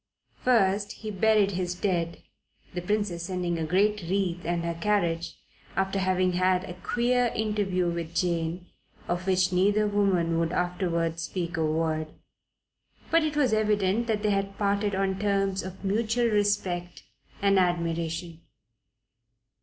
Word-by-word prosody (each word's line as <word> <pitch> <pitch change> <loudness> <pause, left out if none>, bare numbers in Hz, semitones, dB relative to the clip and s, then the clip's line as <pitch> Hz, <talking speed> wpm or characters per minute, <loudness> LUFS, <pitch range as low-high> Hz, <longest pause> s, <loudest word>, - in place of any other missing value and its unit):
First, 205 -4 +2
he 215 -1 -7
buried 210 0 +3
his 180 -1 -2
dead, 175 -3 -2 0.5
the 180 - -3
Princess 205 -2 -1
sending 175 -2 -2
a - - -1
great 205 +5 +2
wreath 180 0 -1
and 170 0 -1
her 170 - -1
carriage, 170 -3 0 0.4
after 195 0 0
having 185 -1 +1
had 185 0 +2
a 180 - -7
queer 245 +6 +1
interview 205 -4 0
with 170 -1 -4
Jane, 170 -1 -1 0.4
of 175 +2 -2
which 185 -1 +2
neither 205 +4 +3
woman 190 -5 +1
would 165 +1 0
afterwards 170 -2 -1
speak 170 0 -3
a 165 - 0
word; 155 0 0 1.0
but 330 0 +4
it 305 -1 -1
was 260 -6 +3
evident 210 +1 +1
that 215 -2 -1
they 210 - +2
had 195 0 -1
parted 200 0 0
on 190 0 0
terms 195 -1 +1
of 190 +1 -8
mutual 225 +4 +1
respect 200 -4 0 0.4
and 200 -1 +4
admiration. 170 -1 -1
185 Hz, 140 wpm, -27 LUFS, 175-205 Hz, 1.0 s, but